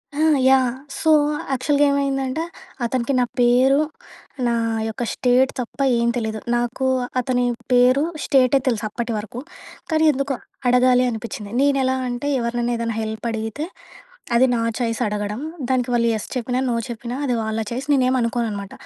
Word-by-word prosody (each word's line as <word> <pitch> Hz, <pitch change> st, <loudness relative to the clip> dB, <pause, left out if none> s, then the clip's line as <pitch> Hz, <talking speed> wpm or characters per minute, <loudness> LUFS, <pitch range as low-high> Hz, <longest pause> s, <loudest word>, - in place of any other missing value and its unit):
ఆ! -, -, -4 dB, 0.3 s
Yeah! 255 Hz, -2 st, +3 dB, 0.2 s
So, 320 Hz, -, +2 dB, 0.4 s
యాక్చల్‌గా 285 Hz, +3 st, +2 dB
ఏమైందంటే, 275 Hz, +1 st, -1 dB, 0.4 s
అతనికి 250 Hz, +2 st, -1 dB
నా 250 Hz, -, +4 dB, 0.2 s
పేరు, 255 Hz, +3 st, +4 dB, 0.7 s
నా 235 Hz, -, +1 dB, 0.4 s
యొక్క 230 Hz, +2 st, -4 dB
స్టేట్ 255 Hz, +1 st, +3 dB
తప్ప 250 Hz, +3 st, -6 dB, 0.2 s
ఏం 235 Hz, 0 st, +1 dB
తెలీదు. 220 Hz, -2 st, -2 dB, 0.2 s
నాకు 240 Hz, +2 st, -1 dB, 0.3 s
అతని 250 Hz, 0 st, 0 dB, 0.3 s
పేరు, 250 Hz, +3 st, +5 dB, 0.2 s
స్టేటే 270 Hz, 0 st, +4 dB
తెలుసు 225 Hz, -4 st, 0 dB
అప్పటి 235 Hz, +2 st, -4 dB
వరకు, 220 Hz, +3 st, -6 dB, 0.5 s
కానీ 315 Hz, 0 st, +3 dB
ఎందుకో 275 Hz, 0 st, -2 dB, 0.3 s
అడగాలి 250 Hz, 0 st, +4 dB
అనిపిచ్చింది. 220 Hz, -2 st, -6 dB
నేనెలా 270 Hz, -2 st, +2 dB
అంటే, 245 Hz, +4 st, -3 dB
ఎవరినన్నా 240 Hz, 0 st, -1 dB
ఏదన్నా 230 Hz, -1 st, -2 dB
హెల్పడిగితే, 220 Hz, +5 st, -3 dB, 0.7 s
అది 260 Hz, +2 st, +5 dB
నా 230 Hz, -, 0 dB, 0.2 s
ఛాయిస్ 230 Hz, -1 st, -1 dB
అడగడం. 210 Hz, +4 st, -3 dB, 0.3 s
దానికి 250 Hz, -1 st, +1 dB
వాళ్ళు 235 Hz, 0 st, +2 dB
యెస్ 215 Hz, -, -4 dB
చెప్పినా, 250 Hz, +1 st, -1 dB
నో 235 Hz, -, 0 dB
చెప్పినా 240 Hz, +1 st, -5 dB
అది 245 Hz, -2 st, +1 dB
వాళ్ళ 220 Hz, 0 st, -2 dB
ఛాయిస్, 260 Hz, +4 st, -4 dB
నేనేమనుకోననమాట. 235 Hz, -6 st, 0 dB
245 Hz, 140 wpm, -21 LUFS, 230-260 Hz, 0.7 s, పేరు